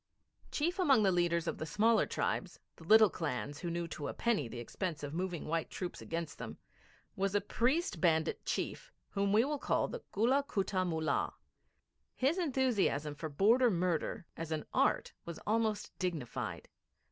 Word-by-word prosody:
Chief 345 +5 -1
among 275 -11 +5
the 195 - +4
leaders 170 -1 +2
of - - -3
the 155 - -2
smaller 220 +7 +3
tribes - - -2 0.2
the - - -13
little 215 +3 +7
clans 145 -2 -3
who 175 - -3
knew 170 0 -2
to 145 -3 -5
a - - -5
penny 225 - +1
the 120 - -8
expense 150 - -4
of 145 0 -4
moving 175 -1 -3
white 165 +1 -1
troops 180 -2 -5
against 165 -1 -4
them - - -6 0.6
was 195 -1 0
a - - +5
priest 240 - 0
bandit 160 -2 +2
chief - - -3 0.2
whom 200 -1 +1
we 220 +4 +5
will 295 0 -2
call - - +1
the - - -6
Gulla 245 +7 +3
Kutta 190 -1 0
Mullah. 160 -2 0 0.8
His 285 +8 +1
enthusiasm 250 - +1
for 155 +2 -5
border 225 - +4
murder 180 0 -1
as 165 0 -5
an 155 -1 -2
art - - +2
was 170 -1 -7
almost 215 -1 0
dignified. 170 -10 -3
185 Hz, 170 wpm, -34 LUFS, 160-230 Hz, 0.8 s, little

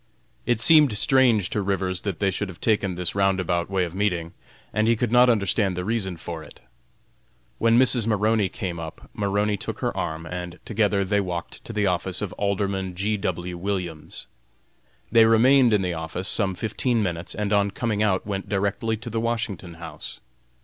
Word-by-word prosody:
It 120 -3 +2
seemed 150 -4 +6
strange 120 -6 +3
to 105 - 0
Rivers 95 -2 -1
that 100 -5 -3
they 100 +2 +1
should 100 +1 -3
have 90 - -10
taken 105 -5 +1
this 90 -1 -2
roundabout 95 -3 +1
way 95 -2 +1
of 85 - -8
meeting, 90 -4 -1 0.4
and 110 +1 +2
he 115 - +4
could 115 0 -1
not 125 +1 +6
understand 100 -3 +1
the 90 - -3
reason 100 -5 -1
for 80 0 -6
it. 75 - -13 1.0
When 115 0 +4
Mrs. 125 -3 +4
Maroney 105 -2 +2
came 90 -2 -5
up, 80 -1 -9
Maroney 105 0 0
took - - -5
her - - -1
arm, 80 -1 -3
and 90 +1 -6
together 105 -3 +1
they 100 +2 +1
walked 90 -3 -5
to - - -7
the 105 -2 0
office 90 0 -1
of 105 -2 -4
Alderman 100 -2 -2
G. 105 +4 0
W. 90 -3 -3
Williams. 85 -5 -4 0.9
They 115 -1 +7
remained 120 +3 +5
in 105 -2 +3
the 90 -1 -1
office 80 +3 -4
some 100 -3 0
fifteen 115 +3 0
minutes, 85 -3 -4
and 105 0 -1
on 100 0 +3
coming 105 +1 -2
out 100 -3 +1
went 100 -2 -4
directly 100 +3 -1
to 120 +2 -8
the 115 0 -1
Washington 110 -7 -3
House. 85 0 -8
100 Hz, 185 wpm, -24 LUFS, 90-110 Hz, 1.0 s, They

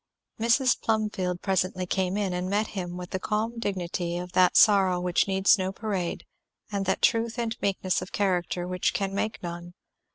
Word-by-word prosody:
Mrs. 235 +3 +3
Plumfield 210 -5 -1
presently 185 -1 0
came 185 +1 -1
in, 200 -3 -1
and 180 +1 -2
met 210 +2 0
him 180 -3 -5
with 180 0 -8
the 190 - -2
calm 220 +4 -2
dignity 175 -4 -2
of 180 0 -6
that 180 -1 +4
sorrow 190 -4 +5
which 180 +1 +1
needs 195 +1 +4
no 190 0 -1
parade 195 -4 -3 0.5
and 200 -2 -2
that 190 - 0
truth 230 +1 +2
and 230 -1 -2
meekness 190 -2 0
of 185 - -8
character 180 -2 -1
which 180 0 -1
can 195 -1 -1
make 215 +1 -3
none. 175 0 -7
190 Hz, 175 wpm, -27 LUFS, 180-210 Hz, 0.5 s, sorrow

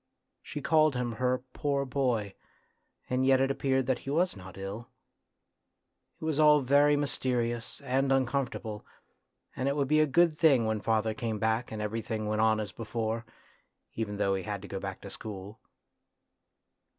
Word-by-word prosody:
She 145 - -6
called 155 -3 +4
him 125 -1 -1
her 125 +2 0
poor 140 -1 0
boy, 125 -7 0 0.7
and 125 +1 0
yet 130 0 +5
it 135 +1 +2
appeared 135 -1 +1
that 130 0 0
he - - -8
was 170 +3 +1
not 95 -1 -11
ill. 100 +5 -6 1.3
It - - -6
was 155 -2 0
all 150 -1 +6
very 145 +3 +4
mysterious 125 -4 -1
and 135 0 0
uncomfortable, 130 -5 -1 0.7
and 130 - -1
it 140 - +1
would 140 -2 0
be 155 +2 +3
a 155 - +4
good 160 +2 +3
thing 140 -8 +5
when 110 -1 -1
father 110 0 +1
came 110 -1 -3
back 110 +3 0
and 110 -1 -4
everything 110 0 -3
went 105 +1 0
on 110 -1 +3
as 105 - -4
before, 115 0 -3 0.7
even 105 -2 -3
though 100 -1 +1
he 95 - -1
had 100 -1 -5
to - - -8
go 95 - -4
back 95 -1 -6
to 100 - -9
school. 105 0 -8
120 Hz, 170 wpm, -30 LUFS, 110-140 Hz, 1.3 s, all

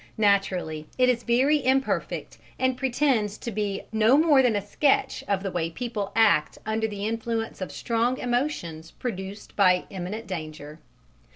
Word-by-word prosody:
Naturally 190 -7 +1
it 255 0 +4
is 240 -2 +1
very 265 +5 +2
imperfect, 265 +1 -1 0.2
and 260 0 +1
pretends 250 -5 +1
to 235 - -5
be 205 -2 -2
no 220 +4 +4
more 300 -3 +5
than 245 -4 +2
a 205 -1 -2
sketch 275 +7 +1
of 195 -1 0
the 195 - -2
way 165 -2 -1
people 210 +1 -4
act 215 -9 +3
under 220 +1 0
the 205 -1 -5
influence 225 -1 -3
of 185 - -4
strong 235 +2 0
emotions 240 - -2
produced 200 -3 -6
by 185 -3 +4
imminent 195 +4 -5
danger. 155 -3 -7
220 Hz, 155 wpm, -26 LUFS, 190-245 Hz, 0.2 s, more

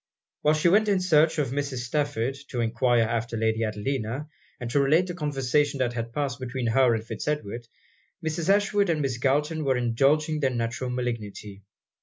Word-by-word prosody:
While 150 +1 +3
she 155 +3 +2
went 210 +5 +4
in 195 -2 +3
search 160 -3 +3
of 145 -5 0
Mrs. 140 -3 -2
Stafford, 135 -2 -1
to 125 - -4
enquire 120 +1 +2
after 115 +1 -2
Lady 110 0 +1
Adelina, 115 +5 -3 0.3
and 125 - -5
to 140 - +3
relate 155 +6 +4
the 180 - -5
conversation 145 -2 0
that 125 -2 0
had 115 -1 -4
passed 140 0 -2
between 130 0 -4
her 120 +1 +4
and 110 0 -4
Fitz 115 +2 -6
Edward, 120 -6 -3 0.6
Mrs. 160 +2 -2
Ashwood 205 -1 +3
and 155 -3 +1
Miss 130 -3 -2
Galton 150 +4 +1
were 135 -2 +1
indulging 140 +6 +2
their 135 -3 +2
natural 120 +1 -3
malignity. 110 -5 -5
130 Hz, 180 wpm, -26 LUFS, 115-150 Hz, 0.6 s, went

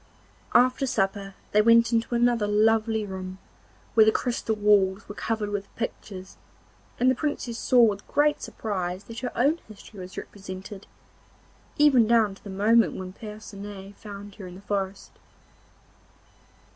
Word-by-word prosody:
After 255 +2 +4
supper 195 -3 -1 0.2
they 210 - +5
went 230 +1 +5
into 230 +1 +1
another 235 -3 +2
lovely 220 +1 +2
room, 190 -1 -6 0.6
where 220 - +7
the 220 - +5
crystal 235 -2 -1
walls 205 -1 +3
were - - -7
covered 215 -1 -2
with 200 -1 -3
pictures, 190 -4 -6 0.6
and 255 +1 +4
the - - +3
Princess 250 -4 -3
saw 250 -2 +5
with 205 -3 +1
great 295 0 +2
surprise 185 -3 -4
that 230 +1 -8
her 250 - -4
own 285 +8 +3
history 215 -1 -13
was 185 0 -9
represented, 195 0 -8 0.9
even 270 -6 +5
down 225 -3 +3
to 195 - -18
the 205 - -9
moment 205 -1 +3
when 185 0 -7
Percinet 205 -2 -9
found 205 -1 -10
her 195 -4 -8
in 180 - -10
the 190 - -12
forest. 200 -1 -3
210 Hz, 145 wpm, -26 LUFS, 195-230 Hz, 0.9 s, where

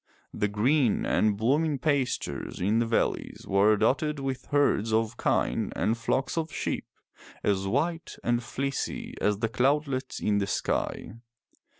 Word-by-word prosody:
The 105 - 0
green 120 +4 +2
and 105 -2 +2
blooming 145 +7 +2
pastures 140 -2 -1
in 105 +5 +2
the 115 - +1
valleys 115 - -1
were 100 +2 +4
dotted 145 +7 +1
with 135 -2 -4
herds 140 -6 +2
of 110 +1 +1
kine - - 0
and 110 - +1
flocks 125 +5 -1
of 160 -1 -3
sheep - - -3 0.6
as 95 -1 +1
white 165 - -1
and 120 0 +2
fieecy 135 +4 -3
as 105 -1 +2
the 115 +2 0
cloudlets 135 +3 0
in 105 -1 +1
the 100 - -1
sky. - - -2
120 Hz, 140 wpm, -28 LUFS, 110-140 Hz, 0.6 s, were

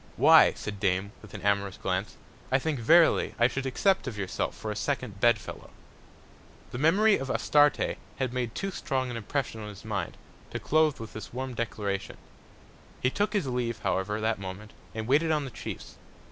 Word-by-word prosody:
Why, - - +7
said 105 -1 -6
Dame, 95 0 0
with 105 -1 -12
an 100 - -8
amorous 100 -1 +1
Glance, 95 +2 -2 0.3
I 130 - +5
think 145 0 -2
verily 165 +8 +4
I 120 - +5
should 135 +1 -3
accept 190 +5 +1
of 115 -4 -5
yourself 95 -2 -3
for 110 - -4
a - - -4
second 125 -8 -3
Bed 120 +1 +5
fellow. 105 - -10 1.0
The 120 - -5
Memory 200 +8 +4
of 135 - -5
Astarte 145 +2 +3 0.2
had 130 -3 -2
made 120 -3 -2
too 195 0 -2
strong 130 -7 -2
an - - -5
Impression 115 0 -3
on 105 - -6
his 105 +1 -11
Mind, 105 -3 -3 0.3
to - - -4
close 155 -2 +2
with 110 -1 -8
this 110 - -8
warm 130 +1 -4
Declaration: 105 -4 -3 0.8
He 130 - +1
took 205 +6 0
his 200 -7 +1
leave, 125 -3 -2
however, 105 +3 0
that 110 -1 0
Moment, 100 +3 -8 0.2
and 110 0 -3
waited 145 +7 +3
on 150 -2 +1
the 130 - -7
Chiefs. - - -8
120 Hz, 190 wpm, -28 LUFS, 105-140 Hz, 1.0 s, Why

